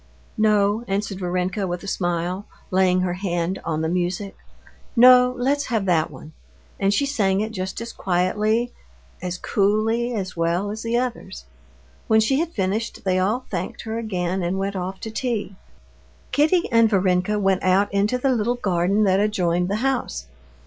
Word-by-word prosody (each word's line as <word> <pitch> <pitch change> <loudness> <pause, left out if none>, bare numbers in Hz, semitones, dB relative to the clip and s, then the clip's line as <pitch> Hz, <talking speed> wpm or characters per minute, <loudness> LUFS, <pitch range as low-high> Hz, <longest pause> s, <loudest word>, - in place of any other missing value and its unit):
"No," 210 0 +3
answered 195 0 -2
Varenka 185 +2 -1
with 175 0 -4
a - - -8
smile, 175 +1 -2 0.2
laying 185 -1 +3
her 180 -1 0
hand 180 -1 -2
on 155 -1 -2
the 160 - 0
music, 180 +3 -2 0.6
"no, 250 +1 +7
let's 280 +3 0
have 225 -5 -1
that 165 -4 +2
one." 155 - -12 0.5
And 195 0 +2
she 280 +8 +2
sang 200 -9 +1
it 215 +1 -2
just 190 -3 -4
as 235 - -6
quietly, 210 +6 0 0.5
as 180 0 -3
coolly, 215 +5 +1
and 235 -3 -2
as 190 -1 -5
well 170 +4 0
as 220 +1 -6
the 230 +1 0
others. 235 - -4 0.6
When 220 - +5
she 265 +6 +2
had 335 0 0
finished, 205 - -2
they 185 -1 +1
all 215 +7 0
thanked 180 -2 -4
her 225 0 -3
again, 185 -4 -2
and 175 +2 -1
went 195 +1 -2
off 185 +1 -4
to 220 - -5
tea. 220 -4 -3 0.8
Kitty 320 +4 +3
and 230 -1 +5
Varenka 185 0 +1
went 195 -2 +1
out 190 +2 +2
into 205 +5 +1
the 265 +2 +1
little 240 0 +1
garden 195 -1 +1
that 190 -1 +3
adjoined 180 -4 +1
the 200 - 0
house. 245 - -1
200 Hz, 170 wpm, -23 LUFS, 180-225 Hz, 0.8 s, no